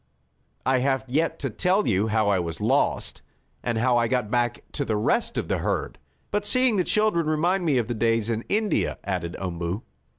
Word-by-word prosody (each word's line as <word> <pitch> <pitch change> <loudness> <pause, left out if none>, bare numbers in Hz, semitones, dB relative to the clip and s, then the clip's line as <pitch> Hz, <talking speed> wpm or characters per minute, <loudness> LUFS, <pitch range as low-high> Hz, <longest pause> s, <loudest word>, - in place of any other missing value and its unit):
"I 130 0 +3
have 135 0 0
yet 155 +6 0
to 135 -4 -2
tell 185 - +1
you 100 +1 +2
how 110 -1 +1
I 100 -2 +3
was 85 -2 -4
lost, - - +1 0.4
and 120 -2 -1
how 120 +1 +3
I 120 -1 +2
got 120 -3 -1
back 120 -2 0
to - - -2
the 110 - -1
rest 105 - 0
of - - -1
the - - 0
herd. - - -2 0.3
But 205 0 -1
seeing 255 -4 +3
the 180 - +3
children 210 -5 +1
remind 175 +4 +1
me 145 -5 +3
of 120 -3 0
the 120 - -2
days 115 -1 +1
in 115 0 -2
India," 210 0 0
added 90 -3 -3
Umboo. 90 +2 -3
120 Hz, 200 wpm, -25 LUFS, 110-170 Hz, 0.4 s, I